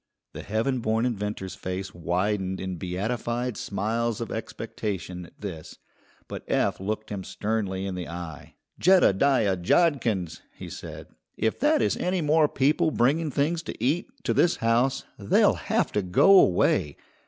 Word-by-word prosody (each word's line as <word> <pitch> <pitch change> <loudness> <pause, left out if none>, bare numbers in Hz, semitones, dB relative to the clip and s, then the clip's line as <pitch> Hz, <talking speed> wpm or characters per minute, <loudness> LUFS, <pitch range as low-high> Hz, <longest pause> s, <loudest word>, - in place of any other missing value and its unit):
The - - -7
heaven 115 +5 -1
born 110 +1 0
inventor's 105 -5 -3
face 95 +1 -5
widened 95 +2 -1
in 95 -1 -4
beatified 115 +7 -2
smiles 110 +4 -2
of 115 -3 -5
expectation 90 -3 -5
at - - -24
this, 85 -7 -7 0.5
but - - -7
Eph - - +1
looked 105 +2 -4
him 100 -2 -4
sternly 100 -3 -2
in 95 - -3
the 90 -2 -5
eye. 85 -3 -8 0.3
"Jeddediah 135 - +4
Jodkins!" 105 - +1
he - - -9
said; - - -8 0.3
"if 110 - 0
that 300 +1 +3
is - - +1
any 180 0 0
more 155 0 +4
people 145 +4 +2
bringing 150 +4 +1
things 150 +5 0
to - - -8
eat 150 +8 +1 0.2
to - - +1
this 175 - +3
house, 120 +4 +1 0.2
they'll 100 - +4
have - - -1
to 105 - 0
go 140 - +6
away. 75 -5 +2
110 Hz, 150 wpm, -26 LUFS, 95-135 Hz, 0.5 s, go